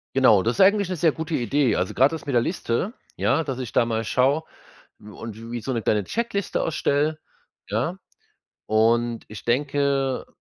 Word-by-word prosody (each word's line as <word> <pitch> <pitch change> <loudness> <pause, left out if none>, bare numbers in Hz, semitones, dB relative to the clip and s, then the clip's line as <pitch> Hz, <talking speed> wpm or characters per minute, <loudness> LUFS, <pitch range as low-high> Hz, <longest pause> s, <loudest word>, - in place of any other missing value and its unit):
Genau, 115 -8 +5
das 115 +2 +1
ist - - +1
eigentlich 200 0 +5
'ne 185 - -3
sehr 165 -1 +3
gute 160 +2 -5
Idee. 130 +1 +1
Also 90 +1 -1
gerade 135 +5 +3
ist 160 - -9
mit 140 - -3
der 120 - +4
Liste, 170 - -2 0.2
ja, 160 +4 +2
dass 135 -3 -4
ich 125 -3 -6
da 115 - +4
mal 115 -1 -2
schaue 135 +7 +2 0.6
und 105 +1 -9 0.2
wie 120 - -3
so 130 +4 -3
'ne 115 - -1
kleine 105 -2 +1
Checkliste 225 -4 -2
erstelle, 155 0 0 0.5
ja. 125 - -1 0.7
Und 115 +2 +2
ich 110 +2 -10
denke 140 +1 0
135 Hz, 180 wpm, -24 LUFS, 115-155 Hz, 0.7 s, Genau